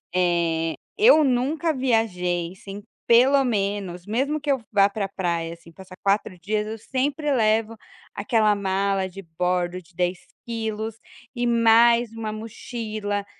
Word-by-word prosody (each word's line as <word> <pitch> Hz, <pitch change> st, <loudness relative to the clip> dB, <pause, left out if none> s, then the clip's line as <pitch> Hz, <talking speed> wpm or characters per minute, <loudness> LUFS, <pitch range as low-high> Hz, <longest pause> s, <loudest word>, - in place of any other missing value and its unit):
Eh, 170 Hz, -2 st, +1 dB, 0.2 s
eu 420 Hz, -8 st, +6 dB
nunca 290 Hz, +5 st, +1 dB
viajei 180 Hz, -, 0 dB
sem, 200 Hz, +1 st, -9 dB, 0.2 s
pelo 265 Hz, +4 st, +5 dB
menos, 200 Hz, -6 st, -2 dB
mesmo 270 Hz, +8 st, -1 dB
que 290 Hz, -1 st, -1 dB
eu 265 Hz, -3 st, 0 dB
vá 200 Hz, -2 st, +5 dB
para 200 Hz, -1 st, -3 dB
praia, 170 Hz, -3 st, -2 dB
assim, 170 Hz, 0 st, -15 dB
passar 185 Hz, +2 st, -13 dB
4 195 Hz, -2 st, 0 dB
dias, 210 Hz, +3 st, -2 dB
eu 220 Hz, +1 st, -5 dB
sempre 280 Hz, +6 st, -2 dB
levo 225 Hz, -2 st, +2 dB, 0.4 s
aquela 215 Hz, +1 st, +2 dB
mala 195 Hz, -1 st, 0 dB
de 195 Hz, +2 st, -10 dB
bordo 180 Hz, 0 st, 0 dB
de 175 Hz, 0 st, -25 dB
10 180 Hz, 0 st, -1 dB, 0.3 s
quilos 220 Hz, -1 st, -4 dB, 0.4 s
e 240 Hz, 0 st, 0 dB
mais 235 Hz, 0 st, +4 dB
1 225 Hz, -1 st, -4 dB
mochila, 215 Hz, -2 st, -5 dB
210 Hz, 140 wpm, -24 LUFS, 185-235 Hz, 0.4 s, eu